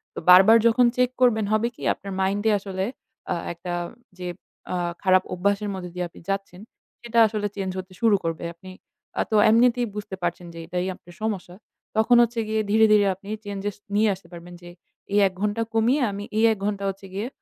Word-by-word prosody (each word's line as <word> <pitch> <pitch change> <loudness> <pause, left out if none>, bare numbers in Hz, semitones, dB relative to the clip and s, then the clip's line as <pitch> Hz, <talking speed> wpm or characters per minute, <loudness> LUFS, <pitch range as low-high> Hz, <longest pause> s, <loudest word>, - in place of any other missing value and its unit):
তো - - -4
বারবার 195 +5 +9
যখন 245 +2 +4
চেক 250 0 +3
করবেন 220 -4 +4
হবে 215 +2 +2
কি? - - -16
আপনার 195 - -9
মাইন্ডে 205 +3 +1
আসলে 190 -1 -3 0.5
আ - - -1 0.2
একটা 175 +1 -6 0.5
যে 180 - -5 0.5
আ - - 0 0.3
খারাপ 185 -1 +4
অভ্যাসের 200 +3 0
মধ্য 180 -1 -6
দিয়ে 180 -1 -2
আপনি - - -16
যাচ্ছেন, 195 -1 -3 0.4
সেটা 235 -1 0
আসলে 210 -1 -2
চেঞ্জ 190 -2 -3
হতে 185 0 -9
শুরু 225 -3 +5
করবে। 165 0 -3
আপনি 185 +2 -13 0.5
আ - - +4
তো - - +2
এমনিতেই 240 +1 +4
বুঝতে 205 -2 -5
পারছেন 175 0 -3
যে 165 - -9
এটাই 180 +2 -2
আপনার 175 -1 -17
সমস্যা। 190 -5 -3 0.4
তখন 220 +3 +4
হচ্ছে 235 0 -2
গিয়ে 220 0 0
ধীরে, 220 +1 +6
ধীরে 210 -1 +5
আপনি 195 +2 -13 0.2
চেঞ্জেস 200 0 -4 0.2
নিয়ে 215 +1 +4
আসতে 190 -2 -13
পারবেন। 175 +1 -10
যে 175 - -11 0.4
এই 205 - +4
১ 190 - -7
ঘণ্টা 210 +2 0
কমিয়ে 235 +6 +2
আমি 200 +1 -6
এই 225 - +3
১ 220 - -1
ঘণ্টা 205 -1 -2
হচ্ছে 195 0 -8
গিয়ে 205 +4 -3
200 Hz, 195 wpm, -24 LUFS, 185-220 Hz, 0.5 s, বারবার